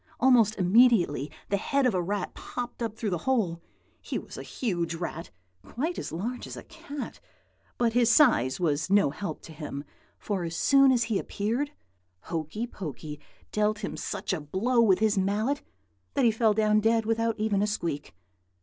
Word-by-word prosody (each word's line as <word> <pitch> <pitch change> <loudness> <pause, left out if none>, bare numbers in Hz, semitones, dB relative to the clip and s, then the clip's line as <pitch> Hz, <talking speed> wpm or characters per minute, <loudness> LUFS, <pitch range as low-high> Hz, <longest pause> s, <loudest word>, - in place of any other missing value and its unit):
Almost 240 -4 +5
immediately 185 - +4 0.2
the 200 - +2
head 275 +6 +1
of 250 - +3
a 180 - +1
rat 195 +2 -2
popped 245 0 -6
up 225 -2 -2
through 215 -2 -2
the 175 - -1
hole. 185 -10 +1 0.4
He - - -3
was - - -8
a - - -6
huge 175 -8 -2
rat, 165 -1 -5 0.3
quite 320 +9 -3
as - - -5
large 225 +10 -4
as - - -8
a - - -8
cat; 285 -1 -8 0.6
but 235 -2 +1
his 240 -1 +4
size 225 - +4
was 155 -2 0
no 200 -7 +4
help 160 0 -5
to - - -11
him, 150 -2 -6 0.3
for 195 -4 -3
as 165 -1 -4
soon 275 - +5
as 245 -2 +3
he 225 -3 0
appeared, 235 +8 -2 0.5
Hokey 165 +7 -3
Pokey 155 - -7 0.3
dealt 210 0 0
him - - -3
such - - -3
a 170 - -2
blow 215 - +1
with 195 -5 +5
his 215 -2 +2
mallet 215 +9 0 0.5
that 275 -3 +3
he 230 - +6
fell 220 -1 +2
down 215 0 +3
dead 225 +1 +2
without 225 0 0
even 210 -2 +1
a 210 - +2
squeak. 165 - -3
210 Hz, 180 wpm, -28 LUFS, 175-235 Hz, 0.6 s, he